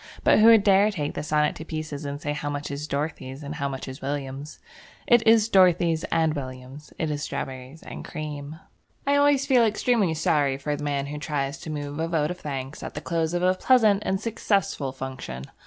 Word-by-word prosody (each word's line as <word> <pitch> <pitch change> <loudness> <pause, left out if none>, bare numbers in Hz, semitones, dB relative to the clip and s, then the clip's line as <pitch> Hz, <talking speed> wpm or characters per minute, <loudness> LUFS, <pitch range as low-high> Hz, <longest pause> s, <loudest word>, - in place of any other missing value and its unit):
But - - +5
who 215 - +7
would 225 -3 +7
dare 200 +1 +5
to - - -3
take 150 -7 -3
the - - -4
sonnet 150 0 +1
to 160 - -7
pieces 155 -2 -5
and 140 0 -4
say 145 0 -2
how 145 0 -4
much 145 0 -4
is 145 +2 -4
Dorothy's, 140 -2 -4
and 145 +1 -5
how 140 -3 -2
much 135 0 -6
is 130 +1 -8
William's? 140 +1 -5 0.5
It 240 -1 +5
is 225 -1 +6
Dorothy's 175 -5 +4
and 160 -1 +1
William's. 130 +1 -8
It 160 -2 -1
is 145 -1 -3
strawberries 135 +1 -6
and - - -8
cream. 150 0 -6 0.5
I 280 +1 +3
always 285 -1 +4
feel 260 -4 +4
extremely 215 -5 +2
sorry 145 -3 +1
for 145 +1 -2
the 145 - -7
man 140 -1 -1
who 150 +1 -6
tries 145 -1 -2
to - - -8
move 145 -1 -5
a 165 - 0
vote 160 -2 0
of 180 - -7
thanks 135 -1 -5
at - - -7
the - - -3
close 165 0 -1
of 175 - 0
a 185 0 +4
pleasant 215 -1 +4
and 190 -2 0
successful 200 - -1
function. 130 - -6
150 Hz, 215 wpm, -25 LUFS, 140-185 Hz, 0.5 s, who